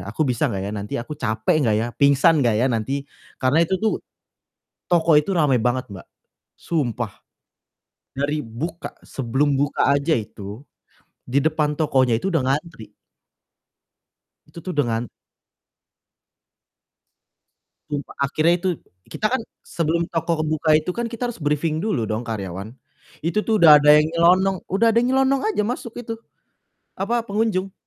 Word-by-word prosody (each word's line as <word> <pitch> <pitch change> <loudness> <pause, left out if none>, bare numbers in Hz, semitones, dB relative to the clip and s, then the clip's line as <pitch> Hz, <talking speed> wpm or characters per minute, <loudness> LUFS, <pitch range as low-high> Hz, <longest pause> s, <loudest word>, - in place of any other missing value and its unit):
Aku 150 +8 0
bisa 125 -2 0
gak 100 - -3
ya? 100 - -4
Nanti 105 0 -4
aku 125 +6 -6
capek 110 -1 0
gak 105 - +2
ya? 115 - -1
Pingsan 140 +2 +5
gak 115 -3 +2
ya 125 - +2
nanti?" 135 +5 -2 0.3
Karena 130 +4 +2
itu 190 - -1
tuh 220 - 0 0.9
toko 170 -1 +3
itu 175 - -6
rame 145 -5 +3
banget, 125 +1 0
Mbak. 95 - -10 0.5
Sumpah, 120 -9 -2 1.0
dari 145 +2 -1
buka 125 +10 -6 0.2
sebelum 135 +3 0
buka 145 0 +1
aja 140 +3 +2
itu, 105 +3 -8 0.6
di 130 - +2
depan 150 -1 0
tokonya 130 -6 +2
itu 195 - -3
udah 150 - +2
ngantri. 140 -7 -4 1.5
Itu 170 - -12
tuh 185 - -5
dengan 120 -4 0 2.8
Sumpah, 145 -1 -4
akhirnya 155 +4 +2
itu 185 - -1 0.4
kita 215 - -2
kan 260 - +1 0.2
sebelum 170 0 -1
toko 165 -1 -1
buka 155 0 +2
itu 155 +4 -1
kan 235 +2 -3
kita 240 +1 -4
harus 200 - -16
briefing 150 +2 0
dulu 190 - -1
dong 110 +1 -2
karyawan. 105 -1 -6 0.5
Itu 190 +6 +1
tuh 220 0 0
udah 155 -5 +8
ada 150 +1 +7
yang 150 - +5
nyelonong 185 +3 +3
udah 205 +5 +2
ada - - -4
yang 245 - 0
nyelonong 270 0 +3
aja 320 - 0
masuk 235 0 -5
itu, 225 - -5 0.9
apa, 230 +4 0
pengunjung. 200 -3 -1
150 Hz, 145 wpm, -22 LUFS, 125-175 Hz, 2.8 s, udah